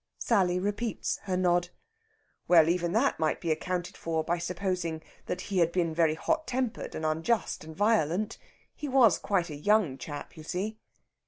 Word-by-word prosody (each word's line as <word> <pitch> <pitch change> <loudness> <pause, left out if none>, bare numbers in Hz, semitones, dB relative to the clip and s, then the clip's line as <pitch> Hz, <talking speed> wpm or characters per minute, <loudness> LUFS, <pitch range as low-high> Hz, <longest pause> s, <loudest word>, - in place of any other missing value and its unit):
Sally 185 -6 +2
repeats 205 +4 -2
her 185 -2 0
nod. 175 -1 +2 0.8
"Well, 165 -2 +6
even 175 0 +1
that 240 +6 +2
might 155 -1 +1
be 170 - -1
accounted 175 +3 -2
for 160 -1 -2
by 170 +2 -1
supposing 175 -2 -2 0.2
that 180 - -3
he 190 -1 -1
had 170 -1 +3
been 170 -3 0
very 160 -1 +3
hot 315 - -1
tempered 255 -2 -2
and 155 - -3
unjust 165 +8 0
and 160 0 -10
violent. 210 -1 +1 0.3
He 295 - -6
was 245 -9 +5
quite 180 -5 0
a - - -5
young 165 -4 +2
chap, 145 +2 -7
you 160 - -10
see...." 195 +7 -4
180 Hz, 170 wpm, -29 LUFS, 160-205 Hz, 0.8 s, Well